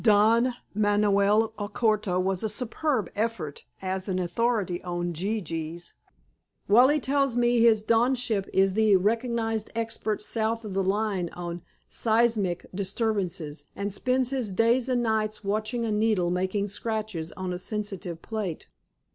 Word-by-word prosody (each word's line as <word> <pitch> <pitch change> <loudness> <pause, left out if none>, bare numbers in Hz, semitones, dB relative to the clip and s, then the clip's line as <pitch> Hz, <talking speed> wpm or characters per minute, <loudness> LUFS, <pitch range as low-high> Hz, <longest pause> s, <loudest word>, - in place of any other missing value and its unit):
"Don 230 +3 +4 0.2
Manoel 205 +1 +3
Alcorta 210 -2 0
was 185 0 0
a 220 - -1
superb 245 - -1
effort 205 -10 -3 0.2
as 190 +1 -2
an 185 - 0
authority 185 0 0
on 175 -1 -2
gee 200 +7 -1
gees. 165 0 -5 0.7
Wally 255 +8 +6
tells 275 -2 +1
me 240 0 +3
his 225 -2 +5
donship 230 -2 +1
is 195 0 +3
the 215 -1 +4
recognized 225 +2 0
expert 225 -2 -2
south 225 0 -1
of 205 - -5
the 195 - +1
line 195 -2 0
on 175 -1 -5 0.3
seismic 220 -6 +1
disturbances, 190 -6 -2
and 200 0 -2
spends 255 +3 0
his 250 -7 -2
days 230 +5 +2
and 245 -1 +1
nights 215 -1 -1
watching 215 +4 -1
a 220 - -1
needle 210 -5 +2
making 190 +3 0
scratches 210 -6 -3
on 185 -1 -4
a 180 - -4
sensitive 195 -4 -5
plate." 210 -7 -4
210 Hz, 140 wpm, -27 LUFS, 185-230 Hz, 0.7 s, Wally